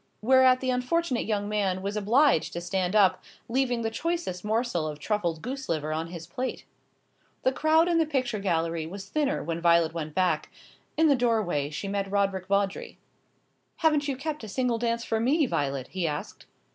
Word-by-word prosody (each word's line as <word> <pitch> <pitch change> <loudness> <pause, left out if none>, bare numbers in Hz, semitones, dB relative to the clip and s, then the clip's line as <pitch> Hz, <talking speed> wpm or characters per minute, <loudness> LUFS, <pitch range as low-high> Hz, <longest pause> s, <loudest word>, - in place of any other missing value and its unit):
Whereat 260 +1 +5
the 260 -1 0
unfortunate 255 +1 0
young 205 -2 -1
man 195 -3 -1
was 200 +1 -3
obliged 220 - +3
to 170 - -3
stand 185 +2 -1
up, 190 -3 +4 0.2
leaving 245 -1 0
the 225 - -1
choicest 330 - -3
morsel 215 -6 0
of 150 -1 -5
truffled 170 -2 -2
goose 270 +2 -5
liver 155 -2 -1
on 160 +1 -2
his 165 -1 -8
plate. 250 +10 -4 0.8
The 260 - +3
crowd 315 +4 +3
in 340 -1 +2
the 320 - +2
picture 255 -7 -1
gallery 165 -4 -1
was 195 +3 -8
thinner 295 +4 0
when 165 +1 -3
Violet 170 -1 +4
went 155 -2 -5
back. 185 -1 +1 0.5
In 320 +1 +5
the 285 - +5
doorway 215 - 0
she 155 +6 -5
met 195 0 -2
Roderick 195 -2 0
Vawdrey. 200 0 -1 0.8
"Haven't 300 -2 +2
you 275 -2 -2
kept 300 -1 -4
a - - -6
single 240 +2 0
dance 235 0 -1
for 225 - 0
me, 285 +7 +3
Violet?" 140 - -2
he 185 -3 -2
asked. 150 -1 -6
210 Hz, 185 wpm, -27 LUFS, 175-260 Hz, 0.8 s, Whereat